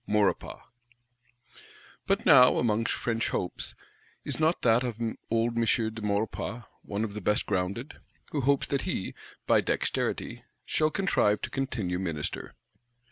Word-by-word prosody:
Maurepas. 105 -1 +1 1.5
But - - +1
now, 125 0 +8
among 115 -1 +1
French 115 -1 -1
hopes, 90 - -3 0.5
is - - -3
not 160 +2 +2
that 115 +1 +4
of 120 -3 -2 0.3
old 115 +1 +1
M. 115 - +2
de 110 -1 0
Maurepas 105 +2 -2 0.2
one 100 +1 -3
of 105 -2 -3
the 105 - -5
best 105 +2 +1
grounded; 100 +9 -2 0.3
who 145 - -1
hopes 140 +1 +2
that 140 -1 -1
he, 175 - -3 0.3
by - - +4
dexterity, - - -2 0.2
shall 155 0 +2
contrive 150 - +2
to - - -3
continue 110 -10 -2
Minister? 80 -6 -4
115 Hz, 135 wpm, -28 LUFS, 105-125 Hz, 1.5 s, now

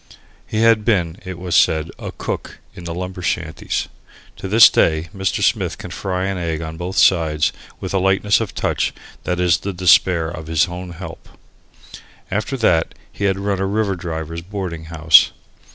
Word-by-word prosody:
He 110 - -1
had 115 -2 +4
been, 90 -6 0
it 95 -1 -6
was 90 -1 -3
said, 80 0 +3
a - - -6
cook - - -5 0.2
in 85 - -11
the 85 - -4
lumber 90 0 -5
shanties. 90 - -2 0.5
To - - -6
this 110 +3 +8
day 80 +1 +1
Mr. 95 -1 -1
Smith - - +1
can - - -9
fry 95 -1 -2
an 95 -1 -2
egg 80 -2 -2
on 80 0 -6
both 90 +3 -5
sides 80 -4 +3 0.3
with - - -5
a 95 - +2
lightness 95 +3 +2
of 110 - -5
touch - - -1 0.3
that 90 -1 -1
is 90 -2 +3
the 100 - -4
despair 90 -1 +4
of 80 -1 -7
his 80 +1 +2
own 90 +1 -7
"help." 85 +2 -10 1.0
After 110 +7 -2
that, 85 -9 +2 0.2
he 100 - -3
had 95 -1 +1
run 100 -1 -1
a 95 - 0
river 100 -1 0
driver's 85 -1 -5
boarding 90 -3 -6
house. 80 0 +5
90 Hz, 180 wpm, -19 LUFS, 80-95 Hz, 1.0 s, this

